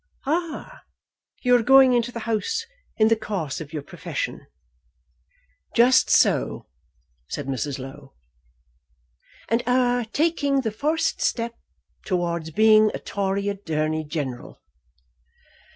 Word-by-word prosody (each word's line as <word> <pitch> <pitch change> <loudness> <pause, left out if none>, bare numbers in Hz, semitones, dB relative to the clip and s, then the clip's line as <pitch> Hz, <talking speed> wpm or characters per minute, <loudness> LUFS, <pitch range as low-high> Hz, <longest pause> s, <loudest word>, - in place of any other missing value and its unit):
"Ah; 340 - -3 0.6
you 250 -1 +5
are 245 - +4
going 265 +1 +6
into 240 0 +1
the 230 - -6
House 225 - -2 0.3
in 220 0 +4
the 225 - +4
course 185 -10 -4
of 150 -2 -9
your 150 -3 -5
profession." - - -5 1.3
"Just 245 +2 +5
so," - - +2 0.6
said 145 - -4
Mrs. 135 +1 -3
Low. 135 +1 -10 1.3
"And 230 +1 +1
are 245 -1 +2
taking 285 +1 +1
the 225 -4 -2
first 310 +8 -1
step 235 -1 -1 0.5
towards 170 -3 -2
being 215 +4 +5
a - - -5
Tory 200 0 -2
Attorney 155 -6 -2
General." 145 -5 -5
215 Hz, 115 wpm, -24 LUFS, 160-250 Hz, 1.3 s, going